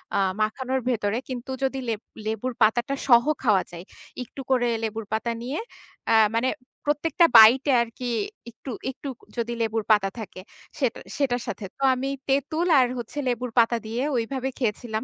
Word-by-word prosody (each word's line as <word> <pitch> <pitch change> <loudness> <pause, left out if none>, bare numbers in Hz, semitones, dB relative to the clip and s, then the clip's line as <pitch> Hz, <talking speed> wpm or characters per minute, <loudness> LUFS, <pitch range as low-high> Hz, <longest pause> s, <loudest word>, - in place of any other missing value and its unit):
আ - - +3 0.2
মাখানোর 260 +4 -1
ভেতরে। 220 -2 0
কিন্তু 255 +1 -5
যদি 270 0 0
লেব 220 -2 -2 0.3
লেবুর 225 +3 -2
পাতাটা 240 +5 +3
সহ 235 -2 +7 0.2
খাওয়া 205 -6 +3
যায়, 170 0 -8 0.4
একটু 270 +3 -10
করে 245 -2 +3 0.2
লেবুর 220 0 -3
পাতা 225 +2 -1
নিয়ে 260 +5 -3 0.5
আ - - +5 0.2
মানে 250 +3 +2 0.4
প্রত্যেকটা 300 +3 +3
বাইটে 255 +6 +8
আরকি 235 +2 -5 0.4
একটু 250 +3 -9 0.2
একটু 275 - -10 0.3
যদি 235 0 -2
লেবুর 225 -1 0
পাতা 200 -2 +4
থাকে 190 -3 -8 0.4
সেটা 255 -5 0 0.2
সেটার 250 -4 0
সাথে। 210 -2 -5
তো 275 - -5
আমি 270 +2 -3 0.2
তেঁতুল 310 +6 +1
আর 250 - +4
হচ্ছে 240 +5 -8
লেবুর 245 0 -2
পাতা 235 +1 +3
দিয়ে 230 +3 -3
ওইভাবে 260 +3 -2
খেয়েছিলাম। 220 -1 -2
240 Hz, 160 wpm, -25 LUFS, 220-265 Hz, 0.5 s, বাইটে